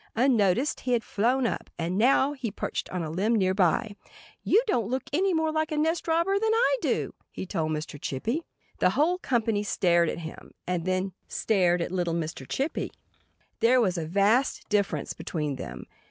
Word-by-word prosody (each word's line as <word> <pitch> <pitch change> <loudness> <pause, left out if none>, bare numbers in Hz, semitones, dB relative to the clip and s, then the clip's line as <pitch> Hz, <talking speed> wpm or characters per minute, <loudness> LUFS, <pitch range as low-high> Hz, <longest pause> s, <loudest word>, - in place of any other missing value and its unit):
Unnoticed 235 0 +2
he 250 - -1
had 235 -2 +1
flown 245 +5 +1
up. - - -2
And 170 +2 -2
now 265 +6 +4
he 260 -5 -4
perched 200 - -4
on 180 -2 -3
a 155 - -4
limb 205 +8 +1
nearby. 195 +2 +2 0.5
"You 440 +5 +3
don't 235 - 0
look 260 +2 -1
any 380 +5 +2
more 320 -2 +1
like 315 0 -1
a 305 - -1
nest 320 +3 0
robber 340 +5 +2
than 440 +1 +1
I - - +3
do," - - -1 0.2
he - - -6
told 160 -3 -2
Mr. 150 -1 -5
Chippy. 230 - -2 0.4
The - - +4
whole 350 +5 +3
company 225 - 0
stared 175 -4 +2
at - - -3
him; 160 - -10
and 175 -2 -2
then 185 0 -1
stared 180 -5 +2
at - - -5
little 175 -2 -1
Mr. 155 -5 -4
Chippy. 285 +5 -2 0.7
There 250 +2 +5
was 190 -6 +2
a 165 -3 -3
vast 205 - +2
difference 205 -1 0
between 150 -5 -3
them. - - -7
215 Hz, 185 wpm, -27 LUFS, 175-275 Hz, 0.7 s, There